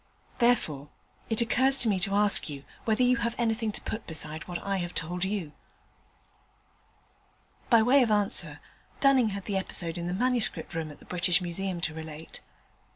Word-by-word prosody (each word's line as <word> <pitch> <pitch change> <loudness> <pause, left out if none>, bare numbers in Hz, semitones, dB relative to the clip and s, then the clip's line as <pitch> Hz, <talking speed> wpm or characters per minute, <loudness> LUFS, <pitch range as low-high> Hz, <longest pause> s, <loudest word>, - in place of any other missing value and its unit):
Therefore, 160 - +1 0.4
it 225 0 +1
occurs 260 +3 +4
to 235 - +2
me 200 -3 +1
to 195 +2 -1
ask 205 -4 +4
you 140 -2 -8 0.2
whether 225 +2 +2
you 250 0 +3
have 235 0 -2
anything 225 -1 0
to - - -4
put 220 - -6
beside 155 -1 -2
what 175 -1 -4
I 195 0 -1
have 175 -1 -5
told 175 +3 -2
you.' 190 -5 -3 2.2
By 230 -3 +5
way 265 +4 +5
of 240 - +2
answer, 205 -2 0 0.4
Dunning 265 -5 +4
had 200 -1 -6
the 200 -2 -2
episode 175 -3 -1
in 170 - -4
the 180 - -2
Manuscript 245 -2 +1
Room 165 -2 -4
at 150 - -11
the - - -17
British 180 0 +2
Museum 180 0 -4
to 160 - -2
relate. 160 0 -9
195 Hz, 175 wpm, -28 LUFS, 170-230 Hz, 2.2 s, By